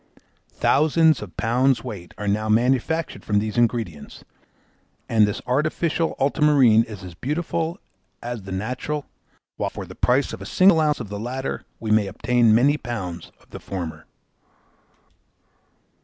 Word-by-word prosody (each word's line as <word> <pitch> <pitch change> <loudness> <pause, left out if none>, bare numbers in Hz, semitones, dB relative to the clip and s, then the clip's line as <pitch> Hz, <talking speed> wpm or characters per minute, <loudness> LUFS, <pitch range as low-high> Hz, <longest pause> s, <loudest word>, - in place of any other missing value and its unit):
Thousands 160 +1 +3
of 90 -6 -10
pounds 125 +2 +2
weight 90 -4 -8
are 105 - -5
now 105 +2 0
manufactured 130 +8 +1
from 105 - 0
these 105 0 -1
ingredients, 115 -10 -1 0.8
and 110 -2 +4
this 105 - -4
artificial 155 +5 0
ultramarine 135 -5 +4
is 105 -3 -10
as 90 -2 -9
beautiful 160 - -2 0.4
as 120 -2 -5
the 95 0 -9
natural, 125 +9 -3 0.5
while - - -1
for - - -7
the - - -11
price 130 +3 +1
of - - -7
a - - -7
single 185 -3 +5
ounce 150 -1 +1
of 105 - -6
the 100 0 -5
latter 130 +4 -4
we 110 -1 -3
may 105 -2 +3
obtain 115 +2 +2
many 140 +6 +4
pounds 95 - -6
of - - -27
the - - -8
former. 80 -5 -6
120 Hz, 145 wpm, -23 LUFS, 105-145 Hz, 0.8 s, single